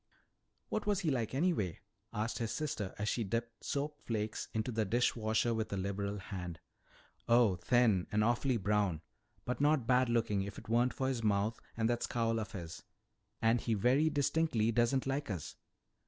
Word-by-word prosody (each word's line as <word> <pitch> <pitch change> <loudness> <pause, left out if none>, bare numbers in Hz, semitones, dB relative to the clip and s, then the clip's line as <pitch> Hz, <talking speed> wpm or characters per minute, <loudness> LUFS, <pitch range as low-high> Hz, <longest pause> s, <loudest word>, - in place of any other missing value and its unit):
"What 215 -1 -2
was 205 -2 +2
he 160 - +1
like 120 -2 -1
anyway?" 135 - 0 0.3
asked 110 +1 -2
his 115 -2 -2
sister 150 -11 -3
as 105 - -2
she 115 - 0
dipped 115 +3 -3
soap 145 +1 -3
flakes 110 -2 -3
into 110 +2 -1
the 110 -1 +1
dish 120 +4 +2
water 110 +1 +1
with 110 -1 -2
a 100 - -1
liberal 100 +1 -2
hand. 90 -3 -6 0.7
"Oh, 115 -5 +5
thin, 110 -1 +3
and 105 0 +2
awfully 120 +3 +2
brown. 100 -5 +1 0.4
But 125 +2 -2
not 145 -4 +3
bad 125 0 +3
looking 115 -4 +1
if 100 +1 -5
it - - -10
weren't 120 +3 +2
for 130 - -1
his 130 -3 -1
mouth 105 +1 +1 0.2
and 110 -1 +2
that 120 0 0
scowl 115 -1 0
of 110 +1 -5
his. 85 -4 -7 0.6
And 115 +1 +4
he 115 - 0
very 130 +9 +3
distinctly 145 -6 +1
doesn't 120 +3 +2
like 135 0 -2
us. 90 -7 -5
115 Hz, 180 wpm, -34 LUFS, 105-125 Hz, 0.7 s, Oh